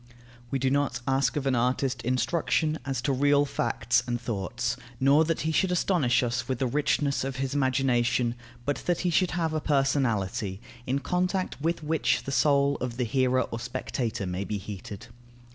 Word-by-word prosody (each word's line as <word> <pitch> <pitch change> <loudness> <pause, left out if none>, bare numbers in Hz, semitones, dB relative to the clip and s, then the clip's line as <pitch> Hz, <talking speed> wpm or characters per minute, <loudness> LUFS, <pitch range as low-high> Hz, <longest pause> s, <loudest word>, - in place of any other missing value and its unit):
We 135 - 0
do 130 0 0
not 140 -3 +1
ask 135 -1 +2
of 140 - -2
an 135 - +2
artist 125 +1 0
instruction 155 +5 0
as 130 -3 -2
to 140 - +1
real 145 +2 +3
facts 120 -3 0
and 120 0 -1
thoughts, 115 +2 -2 0.2
nor 140 +4 +5
that 165 0 -1
he 160 - 0
should 180 +3 +2
astonish 170 -9 +2
us 120 +1 -1
with 130 - -1
the 130 - 0
richness 140 +1 +1
of 135 0 -3
his 135 +1 -2
imagination, 130 -3 +1 0.3
but 145 +1 0
that 175 -1 +1
he 180 - +1
should 180 +2 +3
have 165 -2 0
a 155 - -1
personality, 120 -9 0 0.3
in 130 +2 +1
contact 180 +3 -1
with 165 +1 -1
which 160 +1 +1
the 135 - -5
soul 140 0 +3
of 120 -1 -4
the 125 - 0
hearer 130 +2 +2
or 115 - -3
spectator 120 -3 -3
may 90 +2 -3
be 105 +1 -3
heated. 100 +1 -8
130 Hz, 180 wpm, -27 LUFS, 120-145 Hz, 0.3 s, nor